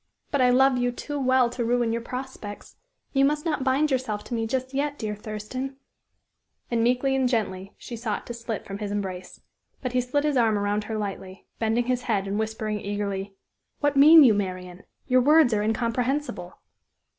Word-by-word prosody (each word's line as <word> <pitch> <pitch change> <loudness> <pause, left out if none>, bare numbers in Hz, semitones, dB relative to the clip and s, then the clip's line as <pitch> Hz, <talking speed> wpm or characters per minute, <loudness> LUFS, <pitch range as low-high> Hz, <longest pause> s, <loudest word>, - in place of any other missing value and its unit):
But 285 - +1
I 250 - +5
love 260 0 +4
you 245 0 +1
too 290 +4 -5
well 260 -2 +3
to 245 0 -3
ruin 235 -1 +1
your 235 - -2
prospects. 250 -4 -7 0.4
You 270 -1 +3
must 295 +2 +1
not 300 -5 -1
bind 275 +3 +2
yourself 235 -6 -1
to - - -8
me 225 -1 -1
just 260 +2 -3
yet, 285 +1 -1
dear 215 -4 -3
Thurston," 215 +6 -6 1.0
and 230 -1 +1
meekly 250 +3 +2
and 260 -2 +2
gently 195 -5 -2
she 240 - -8
sought 225 -2 -3
to 240 - -6
slip 230 -2 -5
from 195 0 -6
his 210 -2 -4
embrace. 190 -3 -5 0.4
But 255 -2 -4
he 250 - +3
slid 260 +4 -1
his 295 -3 +1
arm 225 -3 +3
around 205 +1 -1
her 220 0 -3
lightly, 195 -2 -6
bending 225 +2 +1
his 250 0 0
head 205 -5 -1
and 200 +2 -2
whispering 220 -1 -3
eagerly: 200 -1 -3 0.4
"What 290 -1 +1
mean 305 +3 +9
you, 240 -5 +6
Marian? 185 -2 -4 0.2
Your 255 -1 +4
words 295 -2 +5
are 210 - +1
incomprehensible." 240 +6 -1
235 Hz, 190 wpm, -25 LUFS, 210-260 Hz, 1.0 s, mean